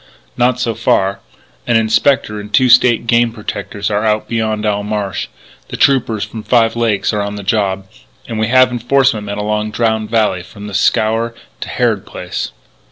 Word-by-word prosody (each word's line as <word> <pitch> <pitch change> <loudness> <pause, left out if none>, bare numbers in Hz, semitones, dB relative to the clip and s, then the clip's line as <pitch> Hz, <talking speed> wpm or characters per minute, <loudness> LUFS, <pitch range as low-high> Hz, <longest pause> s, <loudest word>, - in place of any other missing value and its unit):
"Not 125 0 +1
so 120 -2 0
far. 100 -3 +1 0.5
An 120 - +2
Inspector 115 0 +2
and 105 0 -9
two 130 +4 +4
State 120 -1 +5
Game 115 0 +3
Protectors 105 -2 -5
are 105 +1 0
out 110 -1 0
beyond 110 -2 -1
Owl 105 -1 0
Marsh. 105 -2 -3 0.4
The - - -6
Troopers 115 -6 +2
from 105 +2 -7
Five 115 0 +2
Lakes 115 -4 0
are 105 - 0
on 100 0 -4
the 100 - -7
job, 95 0 0 0.4
and 115 -2 -4
we 110 - +1
have 130 +1 +5
enforcement 120 -3 +1
men 100 0 -4
along 105 +1 -1
Drowned 110 -1 -1
Valley 110 -5 +1
from 100 +3 -11
The 105 - -8
Scaur 110 +3 +1 0.2
to - - -6
Harrod - - 0
Place." - - -5
110 Hz, 175 wpm, -16 LUFS, 105-115 Hz, 0.5 s, State